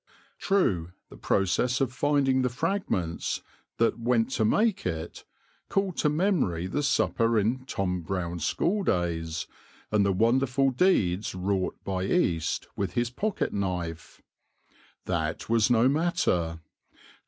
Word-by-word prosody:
True 90 - +1 0.2
the - - -11
process 120 +7 +1
of 130 -3 0
finding 135 -1 +2
the 125 - +1
fragments 120 - -2 0.3
that 115 0 +1
went 115 -1 +1
to - - 0
make 210 - +2
it 85 -1 -5 0.4
called 195 -3 0
to 150 - +2
memory 150 - +1
the 95 +10 -1
supper 115 -5 +2
in 120 +5 0
Tom 90 -7 -2
Brown's 85 -1 -3
School 195 - +1
days, 85 - -1 0.5
and 105 -1 +3
the 100 - +2
wonderful 125 +6 +2
deeds 105 - +1
wrought 95 0 -1
by 95 -1 -2
East 85 - 0
with 100 -2 -2
his 120 -1 0
pocket 205 - -2
knife. 90 -5 -4 0.8
That - - -2
was 115 0 +3
no 120 0 +4
matter. 135 - 0
115 Hz, 130 wpm, -27 LUFS, 90-135 Hz, 0.8 s, no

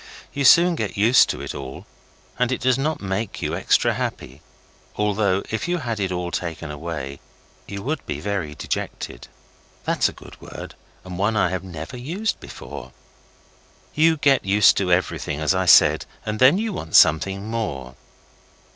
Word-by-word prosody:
You 140 -1 -1
soon 170 +6 +7
get 155 - -4
used 115 +5 +5
to - - -3
it - - -5
all, 65 -1 -8 0.5
and 125 0 +1
it 130 - -2
does 130 0 +3
not 155 +3 -1
make 95 +2 -3
you - - -3
extra - - +2
happy, 65 +4 -5 0.5
although, 100 -2 +1
if 110 +9 -2
you 175 0 0
had 115 -8 -3
it 95 -2 -1
all 90 -1 -3
taken 80 -3 -4
away, 75 -3 -6 0.5
you 100 0 -6
would 150 +2 -3
be - - -3
very 95 -8 -3
dejected. - - -5 0.6
(That - - -1
is - - +4
a - - -10
good - - -15
word, - - -9 0.3
and 90 -1 -7
one 105 +2 +1
I 90 - +3
have 95 0 -3
never 90 +6 -8
used 175 - -3
before.) - - -10 1.0
You 160 +1 +3
get 140 -2 +3
used 100 +1 +5
to 95 -2 0
everything, 85 -4 0
as 75 +3 +2
I 95 0 0
said, - - +6 0.2
and 105 0 -3
then 130 +7 +6
you 220 0 -2
want 80 - -5
something 95 +6 +4
more. 85 - -4
100 Hz, 175 wpm, -22 LUFS, 85-125 Hz, 1.0 s, soon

